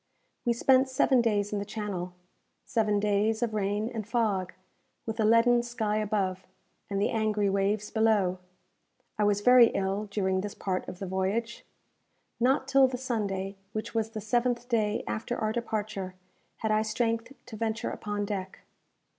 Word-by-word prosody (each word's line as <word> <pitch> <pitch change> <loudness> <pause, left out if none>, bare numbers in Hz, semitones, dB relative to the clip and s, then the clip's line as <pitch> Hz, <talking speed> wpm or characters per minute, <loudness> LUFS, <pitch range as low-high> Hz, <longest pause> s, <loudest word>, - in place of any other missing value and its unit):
We 240 - +3
spent 260 +2 +4
seven 260 -1 +3
days 205 -3 0
in 205 - 0
the - - -2
Channel 200 -4 -5 0.5
seven 210 -2 +1
days 210 +2 +1
of 230 -2 -1
rain 205 +1 0
and 215 -3 -4
fog, 210 -6 0 0.5
with 225 0 -4
a - - +3
leaden 230 +2 +5
sky 225 -3 -2
above, 195 -3 -1 0.4
and 200 -1 -1
the 205 - +1
angry 215 -2 +1
waves 200 +2 0
below. 210 -5 +2 0.8
I - - +3
was 205 0 +2
very 250 +1 +8
ill 195 0 -1
during 190 -2 0
this 205 +1 -6
part 185 -2 -2
of 180 - -7
the 195 - -5
voyage. 195 +5 -2 0.7
Not 265 +2 +2
till 275 -1 +5
the 255 -1 -4
Sunday, 200 -6 -3 0.2
which 215 - -4
was 220 -1 0
the 220 -1 -6
seventh 240 +2 0
day 220 -3 0
after 240 +2 -3
our 215 0 0
departure, 215 -5 -3 0.4
had 220 - -2
I 215 0 +3
strength 230 +2 -1
to 245 - -9
venture 225 0 -2
upon 205 -1 -3
deck. 195 -2 -5
215 Hz, 165 wpm, -28 LUFS, 200-230 Hz, 0.8 s, very